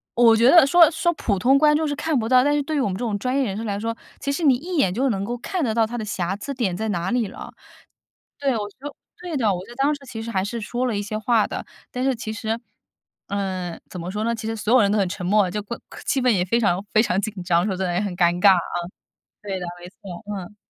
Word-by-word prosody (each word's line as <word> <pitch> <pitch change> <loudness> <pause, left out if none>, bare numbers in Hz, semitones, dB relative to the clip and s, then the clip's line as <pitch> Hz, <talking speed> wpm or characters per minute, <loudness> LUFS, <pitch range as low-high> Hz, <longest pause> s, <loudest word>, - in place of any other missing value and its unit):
我 235 -1 +6
觉 235 +3 +5
得 335 -1 +8
说 335 +1 +7
说 345 +1 +1
普 210 -10 -1
通 265 +7 +4
观 300 +1 +5
众 315 +1 +1
是 290 - -1
看 300 0 0
不 225 -2 -1
到， 255 0 +6
但 290 +1 +2
是 290 - 0
对 310 +1 -2
于 - - +2
我 255 - +1
们 190 - -2
这 - - -6
种 210 -3 -1
专 255 +5 -1
业 275 - +2
人 195 -4 -3
士 225 - -4
来 200 -2 -2
说， 230 +1 -3 0.2
其 280 - -2
实 305 +4 -2
你 275 -4 +5
一 340 +7 -4
眼 190 -11 +3
就 260 +6 +1
能 200 -4 -1
够 240 +3 -3
看 360 +7 -3
得 225 -5 0
到 225 -1 +4
它 240 +2 -5
的 220 - -4
瑕 195 -2 -2
疵 275 +8 -6
点 225 -9 -1
在 220 +2 -2
哪 175 -1 -1
里 245 -3 +1
了。 - - -9 0.9
对， 275 -2 +1
我 215 - -1 0.2
说 290 +2 -8 0.3
对 355 -3 -5
的， 220 -6 +2
我 180 - -5
就 240 - -12
当 275 +3 +2
时 285 - -14
其 225 -2 -6
实 230 +1 -5
还 190 -3 0
是 230 +2 -4
说 245 +4 -2
了 225 -4 -1
一 - - -1
些 210 +1 -4
话 220 0 +2
的， - - -5 0.3
但 250 - -4
是 265 -1 +2
其 225 -1 -5
实， 220 +1 -2 0.7
嗯， 185 -4 -3
怎 180 - -7
么 170 - -5
说 210 +2 -3
呢， 230 +1 0
其 220 -1 -6
实 225 - -2
所 215 +1 0
有 255 - +7
人 200 - +3
都 210 - +2
很 190 -2 +1
沉 180 -1 -5
默， 200 0 +3
就 210 - -2
怪 235 +3 -6 0.3
气 270 - +1
氛 250 - +3
也 180 -5 +1
非 230 +6 +1
常 195 -4 +1
非 215 - +6
常 190 -5 0
紧 205 -3 -5
张， 175 0 +2
说 200 -3 -1
得 185 -1 -1
也 175 - +1
很 200 -4 -3
尴 175 0 +3
尬 200 - +8
啊。 180 - +2 0.8
对 195 -2 -4
的， 180 - -4
没 175 - -9
错， 180 -1 -10
嗯。 195 +2 -8
220 Hz, 310 characters per minute, -23 LUFS, 195-255 Hz, 0.9 s, 得